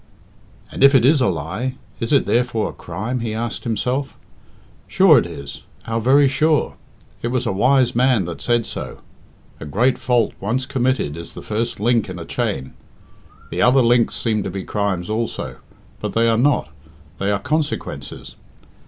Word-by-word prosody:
"And - - -1
if 140 0 +7
it 125 -3 +5
is 145 +1 +4
a 125 - +3
lie, 95 - -3 0.2
is 115 - -2
it 140 - +4
therefore 120 -3 0
a - - -16
crime?" 110 +9 -4
he 115 -2 -3
asked 115 0 -4
himself. 125 +5 -2 0.7
"Sure - - +6
it - - -3
is 70 +1 -8 0.2
how 115 0 -2
very 135 +5 +5
sure! 150 +3 +1 0.5
it - - -2
was 125 +1 -1
a - - 0
wise 125 +5 +3
man 125 -5 +3
that 85 - -6
said 120 -2 +1
so - - -7 0.6
a - - -7
great 120 - +1
fault 120 -4 +1
once 120 +7 -1
committed 130 - 0
is 85 0 -9
the - - -8
first 110 +1 -2
link 115 -1 +1
in 90 - -6
a 85 - -7
chain. 65 -1 -3 0.8
The - - -2
other 130 +1 +5
links 120 0 +3
seem 110 -3 0
to - - -3
be 95 +1 -5
crimes 100 -4 -2
also, 110 +2 -3 0.4
but - - -4
they 115 0 +3
are 115 - +3
not 140 +6 +2 0.5
they 100 - 0
are 100 - +2
consequences. 150 +7 -3
115 Hz, 175 wpm, -20 LUFS, 100-130 Hz, 0.8 s, if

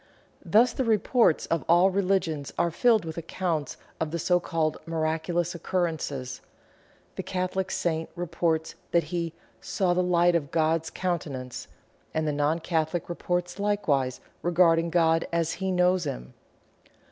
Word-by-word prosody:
Thus 230 +3 +4
the 265 - -1
reports 225 -4 +3
of 165 -4 -1
all 175 +3 +6
religions 185 -7 0
are 170 0 +2
filled 225 +2 +3
with 160 +1 -5
accounts 165 -2 -3 0.2
of 160 - -1
the 170 - -3
so 175 +2 +2
called 160 -3 -1
miraculous 165 +2 -1
occurrences. 160 -8 -2 0.8
The - - -1
Catholic 185 0 -2
saint 160 -2 -1
reports 165 -2 -1 0.2
that 170 -1 +4
he 170 -1 -2 0.3
"saw 185 -3 0
of 175 - +1
light 175 -1 +3
of 155 -5 0
God's 160 +1 +1
countenance," 145 -8 -4 0.5
and 155 0 0
the - - +2
non 145 +2 +1
Catholic 165 0 -1
reports 175 +1 -2
likewise 150 -11 0 0.2
regarding 170 -1 +3
God 165 -1 +2
as 165 -1 +1
he 190 -1 -2
knows 180 -1 +2
him. 60 - -5
170 Hz, 140 wpm, -27 LUFS, 160-180 Hz, 0.8 s, all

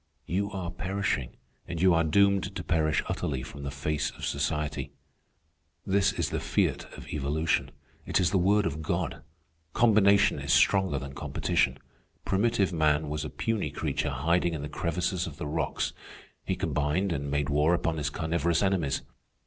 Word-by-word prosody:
You 100 +3 -1
are 95 -4 -4
perishing, 95 -11 -2 0.3
and 85 -1 -4
you 90 +1 +5
are 85 0 +3
doomed 100 +3 +3
to - - -4
perish 80 -2 +1
utterly 65 -4 -2
from 70 +2 -9
the 70 - -4
face 70 +2 -1
of - - -7
society. 75 +1 -2 0.9
"This 95 0 +3
is - - -2
the - - -1
fiat - - 0
of - - -10
evolution. 75 +2 0 0.4
It - - +2
is 90 - +2
the 95 - +3
word 100 +3 +3
of 75 +3 -2
God. 80 - -2 0.5
Combination 100 -3 +4
is - - -2
stronger 95 -7 +4
than 70 +1 -6
competition. - - 0 0.5
Primitive 100 -2 +1
man 75 -1 +2
was 75 0 -2
a 75 - -4
puny 115 -2 -1
creature - - -2
hiding 85 0 +1
in 75 - -5
the 75 - -5
crevices 90 +2 -1
of 75 -2 -8
the - - -5
rocks. 75 +3 -1 0.5
He - - 0
combined 75 +7 0
and 70 -3 -2
made 70 0 0
war 75 +4 +3
upon 85 -1 -1
his 75 -1 -1
carnivorous 85 +3 0
enemies. 90 -8 0
85 Hz, 165 wpm, -28 LUFS, 75-95 Hz, 0.9 s, you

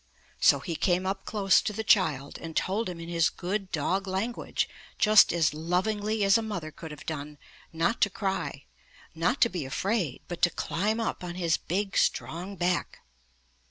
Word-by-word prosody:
So - - +5
he 170 - -4
came 180 +2 +1
up 195 +1 -3
close 200 -3 +3
to 210 - -3
the 220 +2 -3
child, 150 - +2
and 165 -1 -8
told 205 +3 0
him 175 -2 -7
in 165 - -7
his 170 -1 +2
good 190 +1 -4
dog 190 +6 0
language 195 +6 -2 0.3
just 215 -1 +6
as 165 -3 +2
lovingly 205 +7 0
as 195 +3 +5
a - - -2
mother 200 -8 -4
could 160 - -9
have 150 -1 -10
done, 150 -1 -5 0.3
not 165 +7 0
to 205 - +5
cry, 185 -9 -3 0.5
not 175 +12 0
to 235 - +6
be 180 -7 -3
afraid, 180 - -2
but 175 -1 -6
to 175 - +5
climb 210 +6 -1
up 225 -4 -2
on 175 -1 -5
his 170 -3 +1
big, 195 +3 -2
strong 180 +5 -1
back. 175 -1 -1
185 Hz, 180 wpm, -28 LUFS, 165-205 Hz, 0.5 s, just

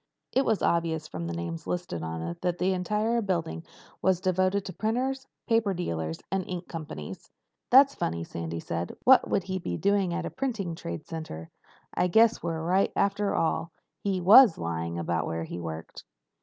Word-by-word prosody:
It 265 - +2
was 220 -3 +1
obvious 165 -2 +1
from 85 - -5
the 85 - -4
names 85 -1 -5
listed 175 - -3
on 80 0 -4
it 85 +1 -5
that 180 -1 0
the 185 +1 +1
entire 210 +5 0
building 170 - -2 0.4
was 190 -2 +3
devoted 185 +1 +1
to 185 - -6
printers, 260 +4 -1 0.2
paper 225 -4 +2
dealers, 80 - -3
and 190 -1 0
ink 180 -1 -5
companies. 150 - -7 0.4
"That's 275 +2 +7
funny," 85 0 -2
Sandy 85 0 -5
said. 85 +1 -4
"What 265 0 +6
would 195 - +1
he 185 0 -3
be 85 - -3
doing 200 -2 +2
at 175 0 -2
a - - -4
printing 225 -10 -2
trade 85 - -6
center? 120 - -7 0.4
I 180 - +2
guess 225 +5 +5
you 170 - -2
were 160 0 -3
right 185 +3 +2
after 200 0 +1
all. 165 0 0 0.3
He 195 -2 0
was 205 +2 +8
lying 85 0 -3
about 85 -1 -1
where 80 0 -2
he 85 - -6
worked." 80 -1 -7
175 Hz, 185 wpm, -28 LUFS, -, 0.4 s, was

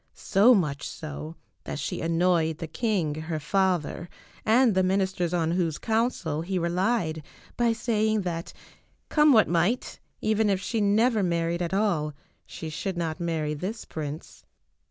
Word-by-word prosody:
So 220 +6 +5
much 150 -7 -1
so 155 +1 -7 0.3
that - - -5
she - - -3
annoyed 165 -1 +2
the 165 - -5
king, 180 -3 -1
her 155 +1 -4
father, 180 0 0 0.3
and 235 +1 +4
the 190 - +3
ministers 190 -2 0
on 165 -2 +1
whose 170 -3 0
counsel 220 -9 -1
he 185 +3 -2
relied 175 -1 0 0.3
by 235 -1 +2
saying 220 -2 +1
that, 170 -2 -4 0.6
come 300 -1 +5
what 220 -5 +6
might, 175 +8 0 0.2
even 215 0 +1
if 195 -2 +1
she 220 +3 -2
never 215 +3 +3
married 170 -1 0
at 170 -1 -2
all, 170 -8 0 0.3
she 160 - -7
should 175 +4 -4
not 165 -1 -2
marry 160 -3 -1
this 185 +9 -5
prince. 150 0 -7
180 Hz, 150 wpm, -26 LUFS, 160-215 Hz, 0.6 s, what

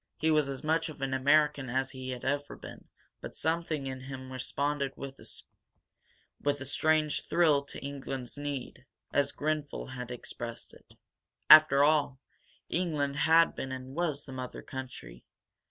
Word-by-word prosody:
He 160 +1 +2
was 150 -3 +3
as 135 -2 -5
much 160 +2 +1
of 155 - -10
an 135 -1 -1
American 145 0 +3
as 130 +2 0
he 130 -1 -7
had 125 -1 -5
ever 145 +1 -1
been, - - -11 0.4
but - - -8
something 160 -2 -1
in 130 -1 -4
him 130 0 -8
responded 140 +1 -1
with 135 -1 -8
a 145 -2 -7
strange 155 +2 +1
thrill 155 -5 +4
to - - -6
England's 135 -3 -5
need, 140 -3 -5 0.3
as 145 - +2
Grenfel 150 -3 -3
had 125 -2 -6
expressed 120 -1 -6
it. - - -19 0.6
After 155 -2 +9
all, 145 -3 +3 0.5
England 150 -6 -1
had 165 +3 +5
been 135 - -4
and 130 0 -6
was 155 -3 -1
the 135 - -11
mother 130 -1 -6
country. 125 - -8
140 Hz, 150 wpm, -30 LUFS, 130-150 Hz, 0.6 s, After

